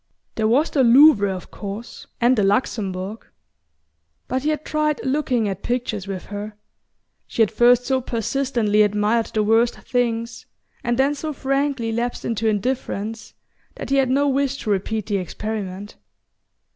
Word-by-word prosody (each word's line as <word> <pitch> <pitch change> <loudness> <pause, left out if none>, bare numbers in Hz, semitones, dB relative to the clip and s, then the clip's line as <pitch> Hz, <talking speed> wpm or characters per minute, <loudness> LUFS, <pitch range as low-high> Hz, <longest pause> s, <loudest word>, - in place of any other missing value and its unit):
There 220 -1 0
was 270 +8 +2
the 275 - +3
Louvre, 235 -5 +6
of 185 -2 -7
course, 205 +3 -8
and 245 +2 +4
the 215 - +1
Luxembourg; 200 -1 -1 1.0
but 260 +1 -1
he 300 - 0
had 305 0 -2
tried 305 -1 0
looking 260 -5 0
at 195 -1 -4
pictures 235 -5 -2
with 190 -2 -5
her, 205 +1 -6 0.7
she 230 - +2
had 215 - 0
first 240 +2 +4
so 260 0 +1
persistently 235 -2 0
admired 210 +2 +2
the 215 - 0
worst 225 +3 +3
things, 235 -1 -2 0.4
and 240 0 0
then 275 +2 +3
so 305 +1 -4
frankly 275 -3 -1
lapsed 235 +2 -3
into 225 -1 -1
indifference, 220 0 -2 0.4
that - - -7
he 275 - +3
had 265 -2 +3
no 280 +2 +2
wish 275 0 0
to 215 - -1
repeat 205 +2 -1
the 205 -2 -1
experiment. 200 +1 -5
230 Hz, 155 wpm, -22 LUFS, 210-265 Hz, 1.0 s, Louvre